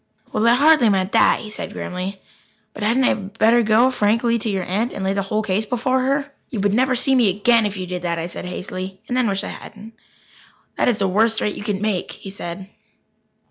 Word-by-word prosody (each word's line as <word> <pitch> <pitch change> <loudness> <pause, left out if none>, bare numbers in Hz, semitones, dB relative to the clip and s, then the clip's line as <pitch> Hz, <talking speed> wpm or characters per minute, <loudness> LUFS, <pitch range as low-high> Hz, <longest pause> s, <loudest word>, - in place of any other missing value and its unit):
"Well, 220 - +2
I 235 - +6
hardly 290 -3 +5
meant 190 -1 +1
that," - - +4
he 215 - -8
said - - -5
grimly. 185 +2 -5 0.5
"But 210 - -10
hadn't 230 +5 +2
I - - +4
better 220 +4 +2
go 230 +4 +4
frankly 230 +1 +1
to 220 - -3
your 195 -2 -1
aunt 210 +8 -2
and 195 - -5
lay 190 0 0
the 200 - -1
whole 215 +3 -2
case 210 +1 -1
before 255 +2 0
her?" 275 +2 -1 0.2
"You 230 - -4
would 200 0 +1
never 255 +3 +2
see 265 +2 +1
me 245 -6 +4
again 215 +3 +3
if 200 -1 -6
you 185 - -4
did 180 0 -5
that," 170 -1 -2
I 165 - -3
said 175 - -6
hastily 185 +1 -6
and 245 - -2
then 255 -2 +2
wished 195 0 -1
I - - -5
hadn't. 215 +2 -11 0.8
"That - - +1
is 235 - +1
the 195 - +1
worst 220 +4 +2
threat 210 - -1
you - - -8
could 205 -2 -2
make," 210 -4 -2
he 195 - -10
said. 190 -1 -7
210 Hz, 230 wpm, -21 LUFS, 195-235 Hz, 0.8 s, I